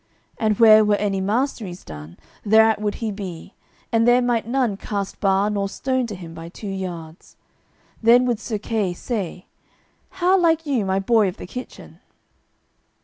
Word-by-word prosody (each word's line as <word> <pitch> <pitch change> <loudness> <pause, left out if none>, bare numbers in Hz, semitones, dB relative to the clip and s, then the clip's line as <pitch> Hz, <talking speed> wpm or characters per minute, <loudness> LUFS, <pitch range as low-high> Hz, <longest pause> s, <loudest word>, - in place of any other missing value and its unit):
And 215 -1 +1
where 215 -1 +8
were 210 -1 +3
any 200 -2 -1
masteries 210 -3 -2
done, 75 +2 -10 0.3
thereat 220 0 +4
would 210 -1 -1
he 225 -2 -3
be, 190 -3 -8 0.4
and 230 0 +3
there 245 +1 +6
might 240 -2 0
none 245 -4 0
cast 200 0 -5
bar 195 0 +2
nor 200 -1 -1
stone 260 +2 -1
to 210 - -6
him 170 -3 -10
by 165 0 -9
two 195 - -11
yards. 180 -4 -7 0.7
Then 240 +2 +5
would 240 -3 0
Sir 220 -1 -4
Kay 205 -4 -2
say, 185 -5 -4 0.6
"How 375 0 +2
like 325 -2 +2
you 260 -8 0
my 190 0 0
boy 210 +1 +3
of 185 +2 -5
the - - -8
kitchen?" 250 +8 -10
210 Hz, 165 wpm, -22 LUFS, 190-240 Hz, 0.7 s, where